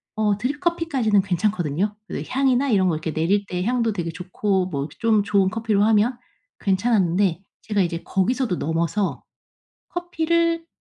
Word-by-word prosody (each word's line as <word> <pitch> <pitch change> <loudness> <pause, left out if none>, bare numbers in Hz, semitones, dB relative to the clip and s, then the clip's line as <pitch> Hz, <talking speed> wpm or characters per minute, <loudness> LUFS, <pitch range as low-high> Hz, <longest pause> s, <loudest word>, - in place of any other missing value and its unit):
어 210 -2 +1
드립 275 +7 -2
커피까지는 280 - +1
괜찮거든요. 190 0 -1
그 - - -4
향이나 265 +1 +2
이런 190 -4 +3
거 160 - +1
이렇게 155 0 -4
내릴 195 +6 +1
때 180 0 -2
향도 235 -3 +1
되게 170 -4 -3
좋고 185 +2 -1
뭐 140 -4 -3
좀 220 -3 +3
좋은 195 -1 +2
커피로 215 -2 +1
하면 225 +3 +3 0.4
괜찮았는데 190 -3 +1 0.2
제가 205 -2 0
이제 170 -1 -2
거기서도 200 +1 0
넘어서 165 +5 -1 0.7
커피를 335 -1 0
205 Hz, 335 characters per minute, -23 LUFS, 180-245 Hz, 0.7 s, 이런